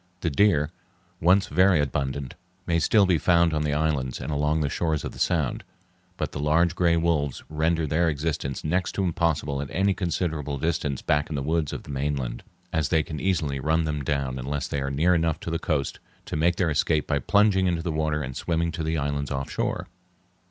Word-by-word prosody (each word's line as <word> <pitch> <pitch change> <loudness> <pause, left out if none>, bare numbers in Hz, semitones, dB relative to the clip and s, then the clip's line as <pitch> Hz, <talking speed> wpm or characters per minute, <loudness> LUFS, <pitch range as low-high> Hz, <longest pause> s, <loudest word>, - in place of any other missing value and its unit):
The 85 - 0
deer, 75 -3 +3 0.5
once 95 +4 +4
very 95 -3 +4
abundant, 70 -2 -2 0.3
may 85 -1 +1
still 100 +6 +4
be 90 -4 +2
found 85 0 +3
on 75 - 0
the 75 -1 0
islands 75 -5 0
and 75 - -4
along 75 +2 +1
the 75 - +1
shores 80 -2 -1
of - - -4
the - - -12
Sound, 80 -7 0 0.5
but - - -2
the - - -5
large 80 +3 +3
gray 85 -2 +2
wolves 80 -5 0
render 80 +1 +1
their 80 +3 +2
existence 75 -3 -2
next 90 +3 0
to 100 - -1
impossible 80 -5 0
at 70 - -5
any 95 +2 +1
considerable 80 -6 -2
distance 70 -2 -1
back 75 -1 +1
in 75 - -3
the 70 - -2
woods 80 0 0
of - - -6
the 70 - -9
mainland, 70 -2 -2 0.3
as 80 -3 +1
they 80 -1 +3
can 75 -1 -6
easily 80 -7 0
run 80 +4 +1
them 75 -2 -2
down 70 -3 -1
unless 70 +3 -3
they 70 - -2
are 70 - -2
near 80 +6 +2
enough 80 -2 +1
to 85 - -4
the 85 - -1
coast 75 -4 -1 0.3
to - - -5
make 85 +3 +2
their 85 -2 +1
escape 75 +1 +1
by 75 -2 0
plunging 100 +2 +3
into 85 -2 0
the 85 - -1
water 75 -1 0
and 65 -1 -6
swimming 85 0 -1
to 85 - -5
the 80 +1 -1
islands 70 -1 -2
off 70 -1 -3
shore. 85 - -2
80 Hz, 210 wpm, -25 LUFS, 70-85 Hz, 0.5 s, once